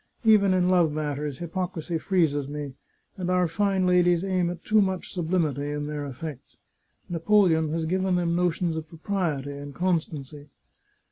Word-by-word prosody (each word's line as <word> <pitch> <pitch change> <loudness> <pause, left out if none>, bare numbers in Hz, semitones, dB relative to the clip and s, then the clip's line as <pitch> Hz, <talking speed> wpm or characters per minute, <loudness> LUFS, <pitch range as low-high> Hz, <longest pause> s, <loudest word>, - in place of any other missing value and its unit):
Even 210 -3 +5
in 180 -1 +3
love 175 -4 +4
matters, 150 -2 -3
hypocrisy 170 -1 -3
freezes 155 -7 +1
me, 145 -1 -5 0.4
and 180 -1 -3
our 180 -1 +3
fine 195 +2 +1
ladies 175 -1 +3
aim 185 -3 +1
at 175 -1 -7
too 215 0 +4
much 190 -2 -2
sublimity 160 -5 -1
in 145 0 -3
their 145 -1 -4
eflfects. 135 0 -8 0.5
Napoleon 170 -2 +3
has 165 0 -1
given 185 +2 +1
them 170 -1 +1
notions 175 -1 0
of 160 -1 -5
propriety 160 -5 -2
and 140 0 -8
constancy. 155 -5 -2
170 Hz, 150 wpm, -26 LUFS, 150-185 Hz, 0.5 s, Even